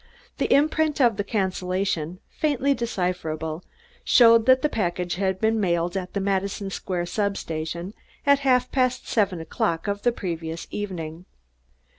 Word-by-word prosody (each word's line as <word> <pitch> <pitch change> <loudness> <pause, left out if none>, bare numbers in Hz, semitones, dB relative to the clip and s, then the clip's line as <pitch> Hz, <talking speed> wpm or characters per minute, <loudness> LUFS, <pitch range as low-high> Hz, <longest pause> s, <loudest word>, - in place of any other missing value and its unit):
The - - 0
imprint 305 +1 +3
of 235 -6 +4
the 205 - 0
cancellation, 185 -3 -2
faintly 280 -3 +1
decipherable, 180 - -3 0.4
showed 230 -2 +6
that 260 0 +5
the - - +4
package 180 -8 -2
had 190 -1 0
been 220 +1 +2
mailed 175 -2 0
at 185 -1 -4
the 200 - -1
Madison 195 0 -1
Square 180 -2 -3
substation 175 -2 -3 0.3
at 280 0 +5
half 255 -2 +2
past 255 -2 0
seven 200 -6 +1
o'clock 165 +2 -2
of 200 0 -2
the 240 - +3
previous 165 -6 -5
evening. 175 -4 -5
195 Hz, 140 wpm, -24 LUFS, 175-230 Hz, 0.4 s, showed